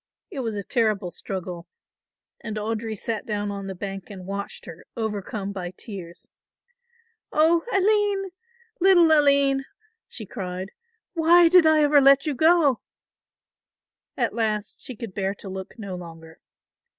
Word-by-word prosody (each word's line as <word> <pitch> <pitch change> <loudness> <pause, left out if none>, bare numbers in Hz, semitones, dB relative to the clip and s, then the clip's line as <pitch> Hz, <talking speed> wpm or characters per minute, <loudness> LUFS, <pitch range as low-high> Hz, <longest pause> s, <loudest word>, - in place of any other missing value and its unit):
It 280 - -5
was 225 -4 -3
a 200 - -4
terrible 215 -5 0
struggle 180 -3 -6 0.7
and 220 -2 -6
Audry 220 0 -3
sat 220 +1 -3
down 205 -1 -3
on 200 -1 -6
the 190 - -5
bank 195 0 -6
and 190 -3 -9
watched 200 +1 -6
her, 165 - -11
overcome 210 -2 -3
by 185 -2 -6
tears. 185 -6 -9 1.0
"Oh, 325 +2 +4
Aline, 400 -1 +2 0.5
little 350 -3 +6
Aline," 280 -2 +4 0.4
she 220 - -8
cried, 185 0 -6 0.4
"why 340 0 +5
did 355 -2 +6
I 310 -1 +5
ever 290 -1 +5
let 275 0 +6
you 300 - 0
go?" 315 -2 +3 1.4
At - - 0
last 215 -2 -2
she 255 - -8
could 220 -3 -8
bear 195 0 -2
to 205 - -11
look 190 +3 -7
no 200 -4 -6
longer. 165 -2 -10
220 Hz, 140 wpm, -24 LUFS, 195-295 Hz, 1.4 s, little